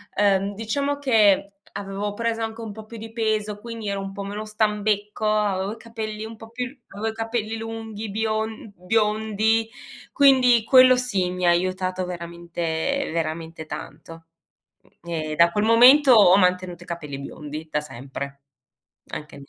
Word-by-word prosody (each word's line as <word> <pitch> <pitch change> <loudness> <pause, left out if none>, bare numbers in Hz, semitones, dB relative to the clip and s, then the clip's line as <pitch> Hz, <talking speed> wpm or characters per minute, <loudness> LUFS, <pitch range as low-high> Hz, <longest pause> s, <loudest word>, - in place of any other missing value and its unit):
ehm, 200 0 +2
diciamo 280 +7 -2
che 210 -7 +3 0.2
avevo 200 +1 -4
preso 230 +1 -2
anche 225 +1 -5
un 220 -2 -6
po' 215 +1 -10
più 230 +1 -10
di 225 +1 -9
peso 215 -2 -1
quindi 230 -2 -7
ero 200 0 -2
un 195 0 -6
po' 200 0 -6
meno 205 +2 -5
stambecco, 210 -1 -1
avevo 205 -2 0
i - - -12
capelli 220 -2 -6
un 225 0 -8
po' 225 0 -12
più 250 +2 -4
l 270 +1 -14
avevo 210 +3 -5
i - - -20
capelli 225 -1 -3
lunghi 225 -1 -6
bion 220 0 -2
biondi, 220 +3 +1 0.4
quindi 255 -5 +5
quello 255 0 +7
sì, 205 -8 0
mi 180 0 -2
ha - - +7
aiutato 185 +1 0
veramente, 170 +7 -3
veramente 160 0 -4
tanto. 165 +2 -9 0.8
Mh, 170 - -9
e 155 -2 -3
da 170 +2 +5
quel 210 +4 0
momento 255 +5 +7
ho 195 -4 +7
mantenuto 180 -1 +1
i - - -19
capelli 150 -5 -6
biondi 150 +2 -8
da 150 - 0
sempre. 140 +1 -8 0.7
Anche 150 -1 -7
lì 140 - -13
210 Hz, 165 wpm, -23 LUFS, 180-225 Hz, 0.8 s, quello